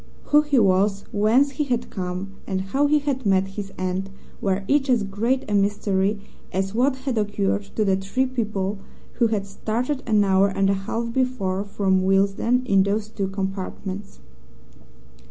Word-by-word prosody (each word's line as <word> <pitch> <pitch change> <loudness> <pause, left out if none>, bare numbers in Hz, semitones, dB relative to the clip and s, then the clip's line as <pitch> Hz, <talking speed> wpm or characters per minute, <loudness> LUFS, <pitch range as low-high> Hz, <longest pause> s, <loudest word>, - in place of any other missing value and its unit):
Who 295 - +8
he 295 -2 0
was, 195 -1 +3
whence 230 +7 +3
he 280 +3 -1
had 245 -3 -2
come, 185 0 -4 0.2
and 190 -1 -1
how 270 +10 +1
he 300 +1 +4
had 280 -3 -2
met 195 -2 +2
his 195 0 -6
end 185 +1 -2 0.3
were 195 0 0
each 280 +1 +2
as 240 -4 +3
great 225 +7 -1
a 210 - -2
mystery 200 0 +1 0.3
as 190 +1 -1
what 255 +4 +2
had 260 -3 -2
occurred 205 -1 -1
to 215 - +1
the 190 -1 +3
three 195 +7 0
people 210 -6 -2 0.4
who 235 - +5
had 210 -3 -1
started 235 +7 -2
an 215 -2 +4
hour 195 0 +4
and 195 0 +1
a 195 0 -3
half 230 0 -2
before 230 -7 0
from 195 -2 +1
Willesden 200 +6 +2
in 195 -5 +4
those 205 +2 0
two 200 -3 -3
compartments. 195 - -5
205 Hz, 170 wpm, -23 LUFS, 195-240 Hz, 0.4 s, Who